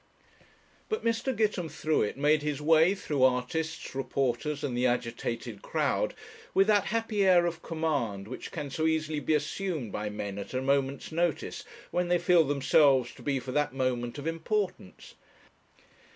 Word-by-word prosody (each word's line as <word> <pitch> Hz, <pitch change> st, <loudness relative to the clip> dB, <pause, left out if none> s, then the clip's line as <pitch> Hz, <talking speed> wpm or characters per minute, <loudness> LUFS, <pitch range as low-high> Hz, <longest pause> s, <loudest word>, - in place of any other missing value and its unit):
But 435 Hz, -, -2 dB
Mr. 230 Hz, +3 st, +1 dB
Gitemthruet 165 Hz, -, 0 dB
made 150 Hz, +2 st, +3 dB
his 150 Hz, -1 st, -2 dB
way 160 Hz, +5 st, +4 dB
through 150 Hz, -8 st, -3 dB
artists, 130 Hz, +6 st, 0 dB
reporters, 135 Hz, +2 st, -1 dB
and 135 Hz, -4 st, -2 dB
the 125 Hz, +1 st, +2 dB
agitated 115 Hz, -2 st, -3 dB
crowd -, -, 0 dB, 0.4 s
with 195 Hz, -, +6 dB
that 205 Hz, -2 st, +3 dB
happy 225 Hz, -2 st, 0 dB
air 180 Hz, -2 st, +5 dB
of 170 Hz, -1 st, -3 dB
command 140 Hz, -12 st, -2 dB
which 130 Hz, -, -7 dB
can 145 Hz, -4 st, -5 dB
so 160 Hz, +3 st, 0 dB
easily 155 Hz, -1 st, 0 dB
be 155 Hz, +1 st, +1 dB
assumed 150 Hz, -, -2 dB
by 105 Hz, +1 st, -3 dB
men 100 Hz, -1 st, -5 dB
at 100 Hz, +5 st, -7 dB
a 130 Hz, -, 0 dB
moment's 140 Hz, +1 st, 0 dB
notice, 165 Hz, -1 st, -1 dB, 0.3 s
when 180 Hz, 0 st, 0 dB
they 175 Hz, 0 st, +3 dB
feel 175 Hz, -1 st, +4 dB
themselves 135 Hz, -2 st, +3 dB
to -, -, -15 dB
be 140 Hz, -2 st, 0 dB
for 130 Hz, -, -6 dB
that 145 Hz, -1 st, 0 dB
moment 125 Hz, -2 st, -1 dB
of 145 Hz, -, -7 dB
importance. 165 Hz, -, -3 dB
150 Hz, 155 wpm, -29 LUFS, 130-170 Hz, 0.4 s, with